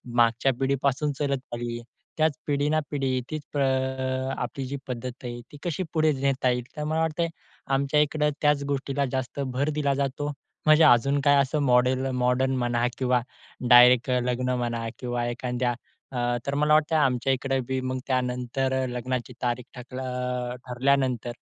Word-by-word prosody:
मागच्या 120 +3 +3
पिढीपासून 140 +2 +1
चालत 140 -2 0
आली, 120 0 -3 0.4
त्याच 155 -1 +3
पिढी 145 0 +1
ना 155 0 +2
पिढी 135 -3 0
तीच 150 -1 -7 0.8
आपली 135 -3 -4
जी 140 - -4
प 135 - -7
पद्धत 125 +1 -6
आहे 120 0 -5
ती 145 - -11
कशी 175 +1 -2
पुढे 155 -1 +3
नेता 135 -2 +2
येईल. 125 -1 0
तर 150 - -2
मला 155 +2 -1
वाटते 160 +1 0 0.5
आमच्या 140 +2 +2
इकडं 150 0 +1
त्याच 150 -1 +3
गोष्टीला 140 +1 -1
जास्त 130 +1 -3 0.2
भर 140 +3 +1
दिला 140 -2 +2
जातो. 145 +2 -2 0.3
म्हणजे 155 +1 +6
अजून 140 0 +5
काय 145 0 +6
असं 145 +3 -1
मॉडेल, 130 +1 +3 0.2
मॉडर्न 130 +1 +2
म्हणा 120 0 +1
किंवा 125 -2 +2 0.5
डायरेक्ट, 125 +1 +7
लग्न 125 +1 -1
म्हणा 120 -1 -2
किंवा 120 -1 -2
एखाद्या 125 0 -1 0.4
अ, 120 -1 0
तर 140 0 -1
मला 150 +1 +3
वाटतंय 155 +1 +3
आमच्या 130 -1 +2
इकडं 135 0 -1
बी 130 0 -1
मग, 130 0 -2
त्यानंतर 125 +1 -1 0.2
लग्नाची 125 0 -3
तारीख 120 0 -1
ठक 125 +1 -10
अ, 125 -1 -3
ठरल्यानंतर 125 -1 +1
130 Hz, 160 wpm, -26 LUFS, 125-140 Hz, 0.8 s, डायरेक्ट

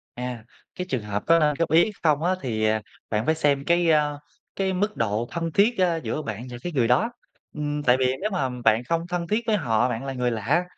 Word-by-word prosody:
À, 125 -2 -5 0.3
cái 180 0 -4
trường 125 -4 -1
hợp 105 0 -3
có 165 0 +6
nên 150 -2 +3
góp 165 -2 0
ý 170 +6 +5
không 150 -2 +2
á 180 +2 +2
thì, 110 -6 -2
à, 110 0 +2 0.3
bạn 110 +1 0
phải 160 - +3
xem 145 -3 +1
cái, 170 -1 +3
a, 150 -1 +3 0.4
cái 190 -1 0
mức 205 +3 -1
độ 110 +1 -1
thân 165 -1 -3
thiết, 210 +7 +3
ơ, 180 -3 +3
giữa 155 - -2
bạn 110 0 -6
và 120 - -7
cái 175 - -4
người 125 -6 +2
đó, 215 - +3 0.4
ừm, 150 -1 -2
tại 125 -3 +4
vì 130 - +2
nếu 210 - -1
mà 180 -10 0 0.2
bạn 110 +2 +4
không 165 +5 -1
thân 175 -1 -2
thiết 215 +4 +1
với 220 -2 +3
họ, 120 - +1
bạn 120 +1 -3
là 135 - -3
người 125 -1 0
lạ, 120 - +1
150 Hz, 245 wpm, -24 LUFS, 120-175 Hz, 0.4 s, có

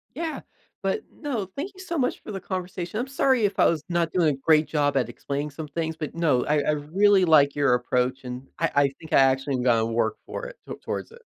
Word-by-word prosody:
Yeah, 325 -2 -3 0.4
but 440 - 0
no, 260 -10 -3
thank 325 +8 -4
you 375 - -16
so 340 -2 -4
much 255 -4 0
for 215 - -8
the 195 - -4
conversation. 185 +1 -4
I'm 245 - -2
sorry 265 -3 +2
if 200 -1 -2
I - - +6
was 160 -3 +2
not 170 -2 0
doing 175 -4 +3
a - - -14
great 155 +2 +3
job 145 -2 +1
at 125 -3 +1
explaining 140 +4 -4
some 150 +2 -7
things, 160 +2 -3
but 155 -2 -5
no, 155 -7 +2
I 150 0 +2
I 145 - +1
really 185 +7 +3
like 145 -4 +5
your 140 -3 +3
approach 125 +2 0
and 125 +1 -7
I 165 - +1
I 145 0 +5
think 160 - -9
I - - +6
actually 135 +1 +3
am 125 - -2
gonna 115 -3 +3
work 115 -1 0
for - - -6
it - - -9
t - - -5
towards - - -4
it. 470 0 -16
155 Hz, 245 wpm, -25 LUFS, 135-195 Hz, 0.4 s, I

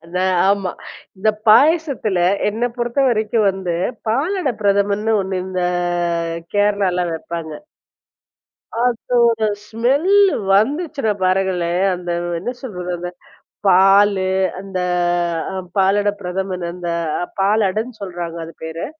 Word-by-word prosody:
நான், 185 0 +1
ஆமா. 195 -3 0 0.5
இந்த 210 +3 +2 0.2
பாயசத்துல 275 - +4 0.3
என்னை 230 +4 -1
பொறுத்தவரைக்கும் 235 -4 +1
வந்து, 190 -3 -3 0.3
பாலடை 290 - 0
பிரதமன்னு 200 +2 +1
ஒண்ணு. 190 0 -4
இந்த 185 -1 -3 0.9
கேரளால 200 -3 +2
வைப்பாங்க. 160 -1 -6 1.2
அதோட 235 -1 +2 0.2
ஸ்மெல்லு 290 - +3 0.2
வந்துச்சுனா 275 - +1
பாருங்களேன், 185 -1 +1
அந்த 175 -1 -6 0.3
என்ன 215 +8 -3
சொல்றது, 180 -7 -5
அந்த 175 +1 -5 0.6
பாலு 195 +1 +5 0.3
அந்த 195 -1 -5 0.7
அ - - -7 0.2
பாலடை 200 +2 +3
பிரதமன் 185 0 -3
அந்த 175 0 -7 0.3
அ - - 0 0.2
பாலடன்னு 215 +3 0
சொல்றாங்க 175 -3 -5
அது 165 - -11
பேரு. 160 +1 -5
200 Hz, 100 wpm, -19 LUFS, 185-230 Hz, 1.2 s, பாலு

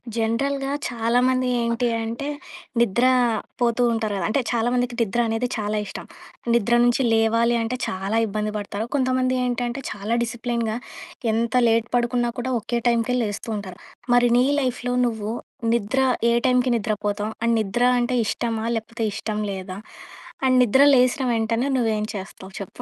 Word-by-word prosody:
జనరల్‌గా 270 +5 -1 0.2
చాలామంది 250 +2 +1
ఏంటి 235 +1 0 0.2
అంటే, 230 +5 -4 0.5
నిద్ర 235 +1 +3 0.6
పోతూ 235 0 +2
ఉంటారు 220 -2 -1
గదా! 180 - -2
అంటే 245 +5 +1
చాలామందికి 245 +1 0
నిద్ర 230 +1 0
అనేది 225 +2 -1
చాలా 210 0 -2
ఇష్టం. 195 - -8 0.5
నిద్ర 235 0 +2
నుంచి 240 +2 +3
లేవాలి 230 +1 +3
అంటే 230 +2 -2
చాలా 195 +4 -2
ఇబ్బంది 210 +1 -2
పడతారు. 205 +1 -4
కొంతమంది 255 -1 +1
ఏంటంటే 245 +1 -2
చాలా 210 +2 -2
డిసిప్లిన్‌గా 235 -1 -2 0.6
ఎంత 225 +1 0
లేట్ 230 0 +2
పడుకున్నా 240 0 +1
కూడా 255 +2 -2
ఒకే 235 +2 -2
టైంకే 235 +1 +2
లేస్తూ 210 +2 -4
ఉంటారు. 190 -3 -8 0.4
మరి 245 0 +4
నీ 250 - +4 0.2
లైఫ్‌లో 250 -1 -2
నువ్వు 220 -3 -2 0.4
నిద్ర 235 +3 +1 0.3
ఏ - - +3
టైంకి 250 0 +3
నిద్ర 215 -1 -2
పోతావు? 205 +1 -1
అండ్ 230 0 +2
నిద్ర 215 +4 -1 0.2
అంటే 245 +1 0
ఇష్టమా 225 -1 -2
లేపోతే 225 +1 -4
ఇష్టం 215 0 -3
లేదా? 185 -1 -6 0.7
అండ్ 255 -1 +4
నిద్ర 250 +3 +4
లేసిన 255 +3 +3
వెంటనే 230 +3 0
నువ్వు 235 -3 +1
ఏం 210 - -2
చేస్తావు 190 0 -8
చెప్పు. 195 - -9
235 Hz, 150 wpm, -23 LUFS, 220-245 Hz, 0.7 s, మరి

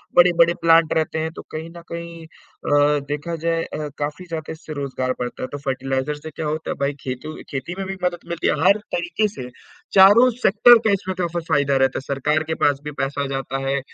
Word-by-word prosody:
बड़े-बड़े 175 -1 +5
प्लांट 165 -1 +5
रहते 160 0 0
हैं 160 0 -2
तो - - -7
कहीं 160 +1 -6
न 170 - -9
कहीं 170 -1 -7
अ, 145 -2 0
देखा 150 +4 -3
जाए 165 0 +1
अ, 150 - -5
काफ़ी 150 +5 -4
ज़्यादा 160 -2 -5
इससे 160 -1 -9
रोजगार 135 -3 -3
बढ़ता 125 0 -5
है, - - -2
तो 145 - -4
फर्टिलाइज़र 135 +1 -2
से 150 +2 -9
क्या 160 - -5
होता 155 +1 -3
है - - -3
भाई 140 +1 0
खेती 130 +4 -6
खेती 140 +5 -4
में 195 - -3
भी 195 - -4
मदद 175 -1 0
मिलती 170 -1 -1
है, - - +3
हर 200 +2 +6 0.2
तरीके 175 +5 0
से 135 -12 -8 0.5
चारों 205 +6 +8
सेक्टर 230 +4 +7
का - - +4
इसमें 190 -1 -2
का 175 - +1
फ - - -9
फायदा 140 -1 +2
रहता 135 0 +2
है। - - -9
सरकार 150 +3 +1
के - - 0
पास 145 -1 +3
भी 150 - -5
पैसा 140 +1 -2
जाता 135 0 -3
है 140 +1 +1
155 Hz, 220 wpm, -21 LUFS, 140-170 Hz, 0.5 s, चारों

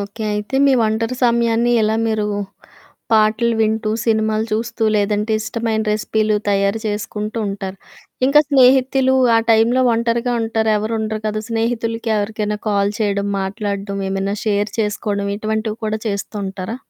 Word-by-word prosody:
Okay. 200 +3 -6
అయితే 210 +5 -3
మీ 275 - +5
ఒంటరి 225 +3 -1
సమయాన్ని 235 0 +2
ఎలా 215 +1 +1
మీరు 220 -1 0 0.9
పాటలు 220 +2 +3
వింటూ, 220 0 +1
సినిమాలు 220 -1 +1
చూస్తూ, 225 +1 -1
లేదంటే 210 +1 0
ఇష్టమైన 220 0 -2
రెసిపీలు 215 0 0
తయారు 200 +2 +1
చేసుకుంటూ 215 +1 -3
ఉంటారు. 195 -1 -5 0.5
ఇంక 275 +2 +1
స్నేహితులు 265 -1 +4 0.2
ఆ - - +5
టైంలో 230 +3 +4
ఒంటరిగా 235 +1 0
ఉంటారు, 225 -1 0
ఎవరు 215 +2 -2
ఉండరు 215 0 -3
కదా! 215 0 -2
స్నేహితులకి 230 0 -1
ఎవరికైనా 210 0 -2
కాల్ 200 0 +1
చేయడం, 200 -1 0
మాట్లాడ్డం, 200 0 -3
ఏమైనా 195 +1 -1
షేర్ 205 0 0
చేసుకోడం 205 -1 -2
ఇటువంటివి 220 +1 -2
కూడా 215 0 -1
చేస్తూ 200 +1 -4
ఉంటారా? 190 +3 -5
220 Hz, 135 wpm, -19 LUFS, 205-230 Hz, 0.9 s, మీ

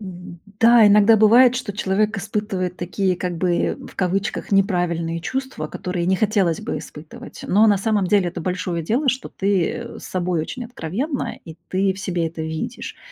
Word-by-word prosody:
Мгм, 180 -3 -10 0.2
да, 230 -1 +7
иногда 210 +2 +6
бывает, 235 +4 +6
что 250 -5 -3
человек 210 +2 0
испытывает 195 -3 -3
такие, 185 +1 -1
как 180 -1 -3
бы, 175 0 0
в - - -15
кавычках 195 +2 -2
"неправильные 175 -4 +1
чувства", 260 - -4
которые 180 +1 -3
не 190 +1 +2
хотелось 200 -6 +1
бы - - -3
испытывать. 150 +1 -11
Но, 210 +4 +4
на 205 -2 +4
самом 205 -1 +1
деле, 200 -2 +3
это 175 0 -6
большое 180 -1 -2
дело, 245 - 0
что 260 0 0
ты, 195 -3 0
э, 235 -1 -7
с - - -11
собой 180 -2 -1
очень 245 +10 -5
откровенна 245 - -4
и 160 -1 -10
ты 190 +1 +1
в 190 - -12
себе 175 -4 -1
это 160 0 -6
видишь. 160 +9 -5
190 Hz, 180 wpm, -21 LUFS, 175-215 Hz, 0.2 s, да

